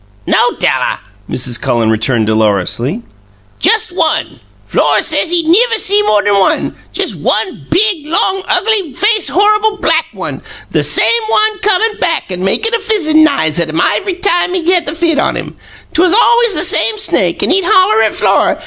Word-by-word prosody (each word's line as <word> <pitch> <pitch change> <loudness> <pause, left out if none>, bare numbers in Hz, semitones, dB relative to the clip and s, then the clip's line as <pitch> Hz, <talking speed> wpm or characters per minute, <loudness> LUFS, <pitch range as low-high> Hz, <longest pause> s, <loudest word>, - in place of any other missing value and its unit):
"No, - - +1
Della," - - -1 0.3
Mrs. 125 -2 -1
Cullen 115 -2 0
returned 110 +1 0
dolorously; 110 - -1 0.6
"jist 440 -5 +1
one. 320 -3 -1 0.3
Flora - - +1
says 305 0 +1
he 345 -1 +1
niver 450 +9 +2
see 410 0 +2
more 210 - +1
th'n 205 -1 +1
one 190 - 0 0.2
jist - - -3
one 370 - -3
big, 360 -5 +1
long, 380 +4 0
ugly 410 -9 0
faced 420 - 0
horrible 425 +2 +1
black 320 -3 0
one; - - -7 0.3
the - - 0
same 465 0 +2
one 430 -1 +1
comin' 425 +2 0
back 330 - -2
an' 180 0 -5
makin' 450 - -1
a 465 - +1
fizzin' 365 -8 +1
n'ise 175 - 0
at 170 -2 -1
um 160 +1 -3
iv'ry 280 - 0
time 360 -1 0
he 355 -1 0
had 350 -4 +1
the 295 - -3
fit 330 -2 0
on - - -1
um. - - -7 0.4
'Twas 360 +3 +2
alw'ys 470 -2 +3
the 305 - +1
same 430 +4 +1
snake; 420 - 0
an' - - 0
he'd 385 +1 +1
holler 375 +5 +3
at - - 0
Flora. - - +1
350 Hz, 175 wpm, -12 LUFS, -, 0.6 s, alw'ys